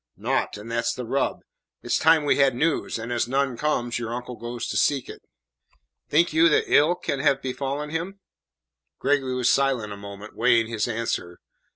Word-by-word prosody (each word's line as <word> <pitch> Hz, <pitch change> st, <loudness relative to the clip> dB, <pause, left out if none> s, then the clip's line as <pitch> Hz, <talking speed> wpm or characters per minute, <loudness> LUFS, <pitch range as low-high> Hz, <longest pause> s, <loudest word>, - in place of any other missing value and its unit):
"Naught, -, -, -1 dB
and 110 Hz, +3 st, -9 dB
that's 115 Hz, 0 st, 0 dB
the 125 Hz, -, -5 dB
rub. 135 Hz, +4 st, -1 dB, 0.4 s
It -, -, -21 dB
is -, -, +3 dB
time 160 Hz, -1 st, +4 dB
we -, -, +3 dB
had 135 Hz, -3 st, +3 dB
news, 155 Hz, 0 st, 0 dB
and 115 Hz, +2 st, -4 dB
as 120 Hz, -1 st, 0 dB
none 135 Hz, 0 st, 0 dB
comes, 120 Hz, -4 st, -1 dB
your 120 Hz, 0 st, -4 dB
uncle 125 Hz, 0 st, -6 dB
goes 120 Hz, 0 st, -6 dB
to -, -, -3 dB
seek 140 Hz, -3 st, +1 dB
it." -, -, -10 dB, 0.9 s
"Think 165 Hz, +2 st, +3 dB
you 165 Hz, +1 st, +5 dB
that -, -, +3 dB
ill 155 Hz, +5 st, +5 dB
can 140 Hz, -5 st, -3 dB
have 140 Hz, -1 st, +2 dB
befallen 140 Hz, +3 st, -4 dB
him?" 175 Hz, +5 st, -4 dB, 0.8 s
Gregory 135 Hz, -2 st, 0 dB
was 125 Hz, -1 st, +3 dB
silent 130 Hz, -6 st, 0 dB
a -, -, -9 dB
moment, 100 Hz, +1 st, -10 dB
weighing 115 Hz, -1 st, +3 dB
his 110 Hz, -1 st, -2 dB
answer. 110 Hz, -6 st, -3 dB
125 Hz, 190 wpm, -24 LUFS, 115-145 Hz, 0.9 s, you